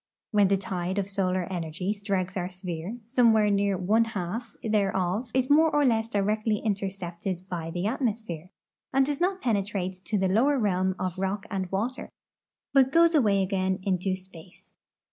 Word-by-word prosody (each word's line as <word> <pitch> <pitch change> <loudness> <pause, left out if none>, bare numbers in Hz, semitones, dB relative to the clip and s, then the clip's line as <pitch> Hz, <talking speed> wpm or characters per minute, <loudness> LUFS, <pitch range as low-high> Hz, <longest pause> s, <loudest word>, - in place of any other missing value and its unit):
When 205 -3 +4
the 195 +1 +3
tide 185 -1 -3
of 200 - +1
solar 185 -2 0
energy 175 +3 -2
strikes 195 -3 -2
our 180 -1 -2
sphere, 180 +2 -5
somewhere 225 -3 +4
near 200 -1 +1
one 210 +5 +3
half 220 +2 -5
thereof 205 +1 0
is 260 +1 +1
more 315 +3 +5
or 295 -2 +2
le.ss 225 -2 +2
directly 210 +1 +1
intercepted 190 -3 -3
by 170 -3 -4
the 175 +2 -3
atmos})here, 215 - -2 0.4
and 270 0 +3
does 290 +2 -2
not 375 +1 +1
penetrate 200 -5 -1
to 210 - 0
the 190 -1 +2
lower 250 +10 +3
realm 190 -4 +1
of 185 0 -3
rock 195 +1 -2
and 190 -2 -3
water, 230 +7 -2 0.6
but 265 -1 +5
goes 335 +2 +5
away 205 -10 +3
again 190 -1 0
into 185 0 0
space. 185 -1 -15
200 Hz, 165 wpm, -27 LUFS, 185-225 Hz, 0.6 s, more